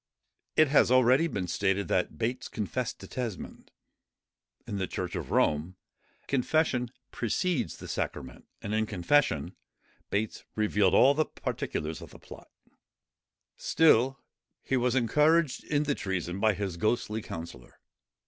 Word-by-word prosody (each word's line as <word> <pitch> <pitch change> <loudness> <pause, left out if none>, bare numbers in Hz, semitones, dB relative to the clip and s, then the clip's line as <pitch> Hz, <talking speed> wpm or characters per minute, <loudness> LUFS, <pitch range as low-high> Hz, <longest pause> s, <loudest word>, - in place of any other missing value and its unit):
It 155 -2 +5
has 145 - +5
been 125 - +4
already 130 - +3
stated, 95 +2 0
that 90 - 0
Bates 120 +2 -2
confessed 115 +3 -3
to - - -9
Tesmond. 120 -7 -6 1.0
In 100 - -4
the 95 - -1
church 90 -1 -4
of - - -5
Rome, 80 +5 +1 0.5
confession 130 -2 +1 0.2
precedes 130 - -1
the - - -9
sacrament; 65 -1 -5 0.2
and 105 - -3
in 110 0 +1
confession, 90 - +1 0.5
Bates 105 +2 -2
revealed 105 -3 +2
all 135 +2 +6
the 155 +2 +1
particulars 80 +1 -4
of - - -10
the - - -13
plot; - - -13 1.1
still 135 -4 +3 0.5
he 135 - 0
was 125 0 +1
encouraged 150 +4 +3
in 150 0 +1
the 145 -1 0
treason 95 -4 -3
by 110 -1 +3
his 95 -3 -4
ghostly 110 +2 0
counsellor. 80 - -9
110 Hz, 135 wpm, -29 LUFS, 95-135 Hz, 1.1 s, all